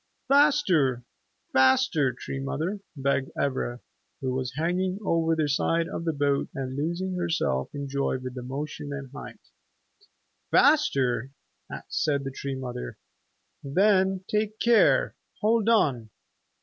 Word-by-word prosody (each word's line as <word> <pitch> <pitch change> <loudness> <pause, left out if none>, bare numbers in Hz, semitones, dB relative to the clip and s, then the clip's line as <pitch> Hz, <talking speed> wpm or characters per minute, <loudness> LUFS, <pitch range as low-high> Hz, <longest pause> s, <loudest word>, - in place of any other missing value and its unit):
"Faster, 265 - +3 0.5
faster, 130 +1 +4
Tree 135 +2 -6
Mother," 160 +9 -3 0.2
begged 140 -1 0
Ivra, 130 -3 -2 0.4
who 130 -1 -2
was 130 -1 -3
hanging 180 +4 0
over 165 -1 +2
the 155 -2 0
side 165 +4 +1
of 165 - -5
the 165 - +1
boat 140 -2 0
and 130 -1 -4
losing 170 +6 -2
herself 165 - -1
in 140 -1 -5
joy 140 -1 -1
with 130 0 -7
the 125 - -6
motion 145 +3 -5
and 140 -2 -6
height. 145 - -11 1.0
"Faster?" 135 - +3 0.6
said 145 -3 0
the 135 - -4
Tree 135 +1 -5
Mother. 125 - -6 0.7
"Then 190 +4 +2
take 215 0 -1
care! 235 -1 +4 0.3
Hold 225 0 +2
on!" 135 - +2
145 Hz, 125 wpm, -26 LUFS, 130-185 Hz, 1.0 s, faster